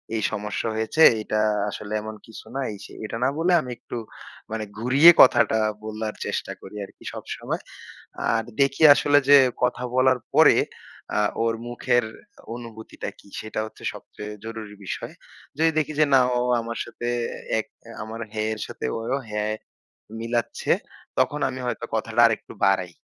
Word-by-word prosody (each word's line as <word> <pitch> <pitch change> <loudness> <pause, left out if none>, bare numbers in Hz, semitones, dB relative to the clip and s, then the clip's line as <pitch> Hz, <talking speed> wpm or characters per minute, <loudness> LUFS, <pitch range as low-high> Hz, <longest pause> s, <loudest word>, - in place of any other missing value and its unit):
এই 110 - 0
সমস্যা 105 0 -3
হয়েছে। 110 +8 0 0.2
এইটা 110 0 -1 0.3
আসলে 105 +1 -6
এমন 110 0 -7
কিছু 110 0 -12
না, 135 - -1
এই-সেই।" 100 - -10
এটা 110 - -4
না 130 - +4
বলে 170 +3 +2
আমি 125 - -7
একটু 120 - -7 0.5
মানে 110 -1 -2
ঘুরিয়ে 135 +9 +7
কথাটা 120 -3 +6 0.3
বলার 110 0 -4
চেষ্টা - - -3
করি 95 - -11
আরকি - - -19
সবসময়। - - -5 0.7
আর 115 - +1 0.2
দেখি 140 +2 +2
আসলে 145 0 +3
যে 145 - +10 0.3
কথা 125 0 +1
বলার 130 0 +4
পরে - - +7 0.6
আ 105 - +3 0.2
ওর 115 0 +1
মুখের 120 0 +1 0.5
অনুভূতিটা 115 -2 -8
কি? - - -19
সেটা 110 0 -5
হচ্ছে 110 - -13
সবচেয়ে 105 0 -9
জরুরি 110 -2 -7
বিষয়। - - -5 0.4
যদি 160 +1 +4
দেখি 155 0 -2
যে 155 - +6
না 135 - +8 0.2
ও - - +2 0.2
আমার 115 0 -5
সাথে 120 - -6 0.5
এক - - -3 0.2
অ্যা 115 - -12
আমার 110 +1 -7
হ্যাঁ 110 0 -1
এর 110 - -7
সাথে - - -6
ওই 115 - -6
ও - - 0
হ্যাঁ 105 0 -1 0.7
মিলাচ্ছে, 120 +1 -1 0.5
তখন 150 - +1
আমি 130 - -6
হয়তো 120 - -3
কথাটা - - +1
আরেকটু - - -3
বাড়াই। 95 -2 +2
115 Hz, 160 wpm, -24 LUFS, 110-125 Hz, 0.7 s, যে